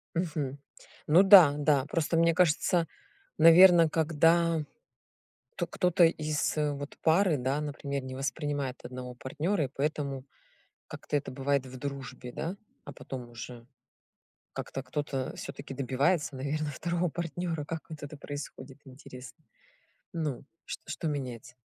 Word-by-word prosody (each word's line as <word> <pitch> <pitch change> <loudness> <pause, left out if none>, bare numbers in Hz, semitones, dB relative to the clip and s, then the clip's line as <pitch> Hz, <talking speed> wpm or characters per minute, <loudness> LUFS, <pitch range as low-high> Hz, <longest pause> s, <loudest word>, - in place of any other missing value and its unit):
Мгм. 150 -5 -2 0.5
Ну 170 +5 +6
да, 185 -7 +9
да. 145 -3 +2
Просто, 165 +1 -1
мне 165 0 +4
кажется, 170 0 +2 0.5
наверно, 165 0 +8
когда 165 +1 +2 0.9
то 175 -3 -2
кто-то 180 -1 +3
из 155 -2 0
вот 145 -1 -2
пары, 170 -1 +3
да, 135 +4 -1
например, 140 -2 -4
не 130 0 -7
воспринимает 140 -1 -3
одного 125 0 -7
партнёра, 150 +7 -2
и - - -4
поэтому 140 -1 -3 0.6
как-то - - -5
это 140 - -5
бывает 135 0 0
в 130 0 -9
дружбе, 130 -2 -6
да, 170 +9 -4 0.3
а 145 - -8
потом 125 -1 -8
уже 120 0 -9 0.9
как-то 135 - -5
кто-то 135 -1 -3
всё-таки 135 - -8
добивается, 140 +4 0
наверно, 145 +3 -2
второго 170 +4 -1
партнёра. 165 -1 -3
Как 165 +1 -4
вот 155 -2 -9
это 145 +1 -7
происходит, 140 -2 -8
интересно? 130 -1 -12 0.7
Ну, 155 -7 -3 0.2
чт - - -6
что 155 +1 -3
меняется? 125 -3 -5
145 Hz, 130 wpm, -29 LUFS, 135-165 Hz, 0.9 s, да